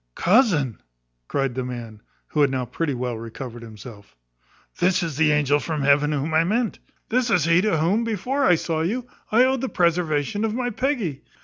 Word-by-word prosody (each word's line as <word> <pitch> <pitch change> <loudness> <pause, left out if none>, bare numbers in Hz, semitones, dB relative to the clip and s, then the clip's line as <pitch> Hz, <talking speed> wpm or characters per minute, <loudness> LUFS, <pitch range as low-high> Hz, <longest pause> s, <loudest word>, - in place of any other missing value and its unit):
"Cousin," 175 - +2 0.5
cries 135 -2 -1
the 130 +1 -3
man, 120 -4 -7 0.3
who 150 - 0
had 140 - +4
now 130 -1 -2
pretty 140 +4 -2
well 125 -1 -3
recovered 115 +1 -8
himself, 110 - -12 0.6
"this 185 0 +2
is 165 -4 -3
the 155 +1 +3
angel 145 -1 +2
from 155 -2 -3
heaven 145 +1 +3
whom 150 +2 -2
I 160 +1 +4
meant. 220 +6 -1 0.3
This 245 +1 +1
is 180 -9 +3
he 165 +2 +4
to 205 -4 +1
whom, 185 +9 +1
before 240 +6 -1
I 180 - +5
saw 160 -1 -2
you, 230 +9 -2 0.3
I 235 +3 +5
owed 260 -1 +1
the 265 - -2
preservation 170 +1 0
of 220 0 -1
my 245 0 -1
Peggy. 215 - -2
160 Hz, 190 wpm, -23 LUFS, 135-210 Hz, 0.6 s, I